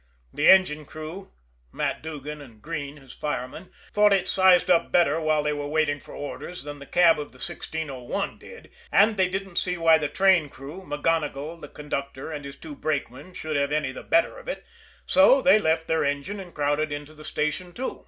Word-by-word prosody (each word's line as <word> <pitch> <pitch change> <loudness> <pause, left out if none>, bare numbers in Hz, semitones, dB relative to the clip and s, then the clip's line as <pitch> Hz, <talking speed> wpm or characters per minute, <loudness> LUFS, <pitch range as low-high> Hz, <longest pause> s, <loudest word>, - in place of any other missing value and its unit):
The 145 - +3
engine 155 -6 +5
crew, 160 +5 -8 0.4
Matt - - -2
Duggan 150 -1 -7
and 120 -6 -14
Greene, 150 0 -5
his 135 -3 -14
fireman, 150 +4 -5 0.2
thought 210 0 +5
it 190 -1 +1
sized 185 -1 +5
up 170 - +3
better 165 -3 +3
while 155 -1 +1
they 150 0 0
were 145 -1 -4
waiting 150 -1 +1
for - - -13
orders 160 +4 -7
than 145 0 -8
the 140 - -11
cab 170 -3 +4
of 145 - -7
the - - -18
1601 150 +6 -4
did, 475 - -13 0.2
and 215 +2 +5
they 190 -2 +2
didn't 195 -1 -5
see 180 -1 +1
why 165 -1 +5
the 150 - -1
train 180 -1 +3
crew, 145 +6 -10
MacGonigle, 150 0 -2
the 150 - -8
conductor, 140 -1 -5
and 145 -2 -6
his 140 0 -8
two 160 -2 -10
brakemen, 145 +3 -4
should 155 -1 -4
have 140 0 0
any 150 -3 0
the - - -8
better 335 +9 +1
of - - -15
it - - -5 0.4
so 275 -1 +6
they 265 -5 +5
left 160 -3 +1
their 160 0 +1
engine 145 +9 -2
and 180 -3 -10
crowded 145 +1 0
into 145 +1 -6
the 155 0 -13
station, 155 +4 -2
too. 255 +8 -5
155 Hz, 200 wpm, -25 LUFS, 145-180 Hz, 0.4 s, so